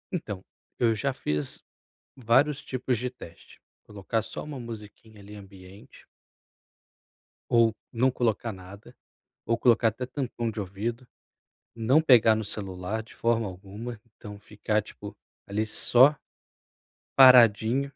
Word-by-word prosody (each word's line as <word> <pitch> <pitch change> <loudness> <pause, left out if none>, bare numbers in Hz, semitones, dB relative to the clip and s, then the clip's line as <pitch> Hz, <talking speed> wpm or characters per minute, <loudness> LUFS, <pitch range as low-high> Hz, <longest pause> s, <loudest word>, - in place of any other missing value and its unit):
Então, 100 - -6 0.3
eu 115 -2 +2
já 135 +6 -1
fiz 75 - -4 0.5
vários 135 +4 +2
tipos 130 -1 -2
de 125 +3 -3
teste. 85 -9 -15 0.2
Colocar 105 +2 -3
só - - -8
uma 145 -3 -8
musiquinha, 110 -2 -11
ali, 105 +1 -12
ambiente 95 0 -15 1.5
ou 115 -2 +3 0.2
não 125 +2 +2
colocar 115 -2 -1
nada, 100 +5 -13 0.5
ou 115 0 +1
colocar 120 -2 +3
até 115 +4 -6
tampão 125 -3 -4
de 110 -1 -6
ouvido. 115 +6 -5 0.7
Não 125 +7 +3
pegar 120 -8 +5
no 110 - -3
celular 100 +1 -4
de 115 - -17
forma 115 -2 0
alguma, 105 +5 -9
então, 105 -1 -11
ficar, 105 +1 -2
tipo, - - -11 0.3
ali, 105 +2 -2
só 130 +6 +4 1.0
paradinho. 125 -1 +6
115 Hz, 125 wpm, -26 LUFS, 105-125 Hz, 1.5 s, paradinho